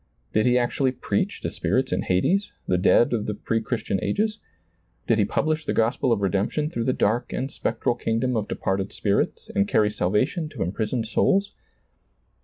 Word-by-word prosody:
Did 110 Hz, +3 st, +3 dB
he 125 Hz, 0 st, +4 dB
actually 125 Hz, +2 st, +1 dB
preach 200 Hz, +9 st, -2 dB
to -, -, -3 dB
spirits 130 Hz, 0 st, 0 dB
in -, -, 0 dB
hades, 190 Hz, -, +1 dB, 0.2 s
the 90 Hz, -1 st, +2 dB
dead 120 Hz, +6 st, +4 dB
of 110 Hz, -3 st, -1 dB
the 105 Hz, -, -2 dB
pre 115 Hz, +2 st, -1 dB
Christian 110 Hz, -4 st, -2 dB
ages? 215 Hz, +1 st, 0 dB, 0.7 s
Did -, -, +2 dB
he -, -, +4 dB
publish 155 Hz, 0 st, 0 dB
the -, -, -2 dB
gospel 115 Hz, +3 st, +1 dB
of 110 Hz, -3 st, +2 dB
redemption 100 Hz, -, 0 dB
through 115 Hz, -7 st, -2 dB
the 130 Hz, -, +3 dB
dark 120 Hz, +3 st, 0 dB
and 135 Hz, +2 st, -3 dB
spectral 115 Hz, +1 st, -1 dB
kingdom 120 Hz, +1 st, -1 dB
of 105 Hz, -2 st, -1 dB
departed 95 Hz, +1 st, -2 dB
spirits 100 Hz, -1 st, -1 dB
and 100 Hz, 0 st, +2 dB
carry 105 Hz, 0 st, +3 dB
salvation 105 Hz, -, 0 dB
to -, -, -3 dB
imprisoned 110 Hz, +5 st, -2 dB
souls 195 Hz, -, +2 dB
115 Hz, 180 wpm, -24 LUFS, 105-135 Hz, 0.7 s, he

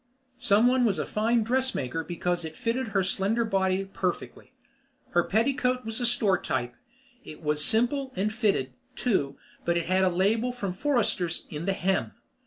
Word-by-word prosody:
Someone 245 Hz, +2 st, +4 dB
was 210 Hz, -5 st, +2 dB
a -, -, -1 dB
fine 225 Hz, +2 st, +1 dB
dress 260 Hz, +3 st, +1 dB
maker 135 Hz, +5 st, -2 dB
because 175 Hz, +1 st, -2 dB
it 160 Hz, 0 st, -7 dB
fitted 240 Hz, +2 st, -1 dB
her 200 Hz, -2 st, +1 dB
slender 205 Hz, +5 st, 0 dB
body 195 Hz, -2 st, +1 dB
perfectly. 185 Hz, -2 st, -4 dB, 0.6 s
Her 175 Hz, -, +3 dB
petticoat 250 Hz, -, +1 dB
was 225 Hz, 0 st, -4 dB
store 210 Hz, -6 st, +2 dB
type. 120 Hz, -2 st, -2 dB, 0.5 s
It 155 Hz, -, -11 dB
was 150 Hz, 0 st, +1 dB
simple 245 Hz, -, +2 dB
and 210 Hz, +3 st, -1 dB
fitted, 200 Hz, -, 0 dB, 0.2 s
too, 145 Hz, -, 0 dB, 0.3 s
but 170 Hz, 0 st, +1 dB
it 170 Hz, -, -1 dB
had 185 Hz, +1 st, +2 dB
a 185 Hz, -, +4 dB
label 210 Hz, +7 st, +1 dB
from 200 Hz, -7 st, -3 dB
Forresters 200 Hz, -, 0 dB
in 155 Hz, +4 st, -5 dB
the 195 Hz, -, +2 dB
hem. 190 Hz, -, -1 dB
195 Hz, 165 wpm, -27 LUFS, 175-235 Hz, 0.6 s, Someone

